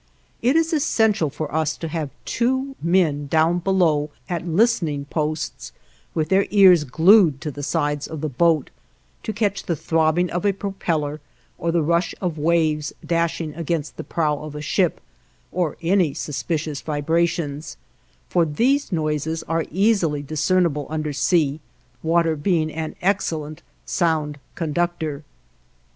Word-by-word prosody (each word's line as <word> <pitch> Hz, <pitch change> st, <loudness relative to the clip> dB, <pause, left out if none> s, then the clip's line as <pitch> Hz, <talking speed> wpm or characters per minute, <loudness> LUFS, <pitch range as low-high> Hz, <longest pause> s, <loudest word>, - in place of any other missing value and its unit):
It 250 Hz, +5 st, +3 dB
is 325 Hz, +1 st, +2 dB
essential 220 Hz, -, +2 dB
for 150 Hz, +1 st, -5 dB
us 160 Hz, 0 st, 0 dB
to 165 Hz, -, -5 dB
have 155 Hz, -2 st, -3 dB, 0.2 s
two 260 Hz, +3 st, 0 dB
men 160 Hz, -4 st, +2 dB
down 160 Hz, +4 st, +2 dB
below, 170 Hz, -5 st, +2 dB, 0.2 s
at 175 Hz, 0 st, -3 dB
listening 165 Hz, -6 st, +1 dB
posts, 150 Hz, -, -3 dB, 0.4 s
with 155 Hz, -1 st, 0 dB
their 195 Hz, +1 st, +3 dB
ears 185 Hz, -6 st, +6 dB
glued 165 Hz, -, +5 dB
to 150 Hz, -, -3 dB
the 145 Hz, -, -7 dB
sides 145 Hz, +1 st, -1 dB
of 160 Hz, -3 st, -6 dB
the 155 Hz, -, -1 dB
boat, 155 Hz, +2 st, +2 dB, 0.5 s
to -, -, -3 dB
catch 205 Hz, -2 st, -1 dB
the 170 Hz, -, -1 dB
throbbing 160 Hz, +3 st, +1 dB
of 175 Hz, -, -2 dB
a 200 Hz, -1 st, +3 dB
propeller, 165 Hz, -7 st, -2 dB, 0.4 s
or 170 Hz, -, 0 dB
the 165 Hz, -1 st, +2 dB
rush 170 Hz, +3 st, +1 dB
of 170 Hz, -5 st, -3 dB
waves 155 Hz, -2 st, +1 dB
dashing 165 Hz, -2 st, -1 dB
against 165 Hz, -1 st, -3 dB
the -, -, -6 dB
prow 150 Hz, -3 st, 0 dB
of 150 Hz, -1 st, -8 dB
a -, -, -4 dB
ship, 175 Hz, +3 st, +1 dB, 0.5 s
or 175 Hz, -4 st, -1 dB
any 170 Hz, -4 st, +2 dB
suspicious 150 Hz, -1 st, -3 dB
vibrations, 155 Hz, 0 st, -1 dB, 0.5 s
for 175 Hz, -, +2 dB
these 245 Hz, -, +1 dB
noises 155 Hz, -1 st, -1 dB
are 165 Hz, 0 st, -1 dB
easily 180 Hz, -6 st, +1 dB
discernible 155 Hz, +1 st, +1 dB
under 155 Hz, -1 st, -2 dB
sea, 150 Hz, 0 st, +2 dB, 0.4 s
water 165 Hz, 0 st, +2 dB
being 155 Hz, 0 st, 0 dB
an 160 Hz, 0 st, -4 dB
excellent 160 Hz, -5 st, -1 dB, 0.2 s
sound 155 Hz, -4 st, 0 dB, 0.2 s
conductor. 160 Hz, -2 st, -2 dB
160 Hz, 140 wpm, -22 LUFS, 150-180 Hz, 0.5 s, ears